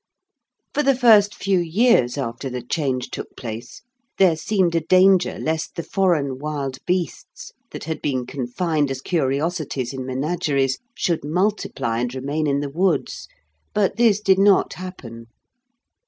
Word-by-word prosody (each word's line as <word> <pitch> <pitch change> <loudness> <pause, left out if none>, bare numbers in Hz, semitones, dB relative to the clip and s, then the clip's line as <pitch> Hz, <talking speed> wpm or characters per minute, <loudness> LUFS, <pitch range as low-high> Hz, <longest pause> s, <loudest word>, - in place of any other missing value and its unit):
For 295 - +1
the 275 -2 +3
first 215 -5 +5
few 195 -2 +1
years 170 - +2
after 130 0 -4
the 125 -1 -5
change 130 -2 -2
took - - -7
place 115 - -8 0.3
there 185 -4 +5
seemed 180 +1 0
a 165 - +3
danger 185 +2 +4
lest 160 0 -3
the 170 - -4
foreign 155 -10 0
wild 140 -3 -4
beasts 180 -4 -3 0.2
that - - -8
had 160 0 -4
been 130 -4 -1
confined 145 +4 -1
as 135 -1 -3
curiosities 140 -3 -1
in 130 -1 -5
menageries 135 -1 0 0.2
should 170 -5 -1
multiply 160 - -1
and 125 +1 -2
remain 145 +4 -2
in 140 0 +1
the 145 - -3
woods. 170 -1 -1 0.5
But 205 0 +1
this 225 -4 +4
did 195 -2 +3
not 200 -1 +4
happen. 120 -11 -9
155 Hz, 145 wpm, -22 LUFS, 130-185 Hz, 0.5 s, first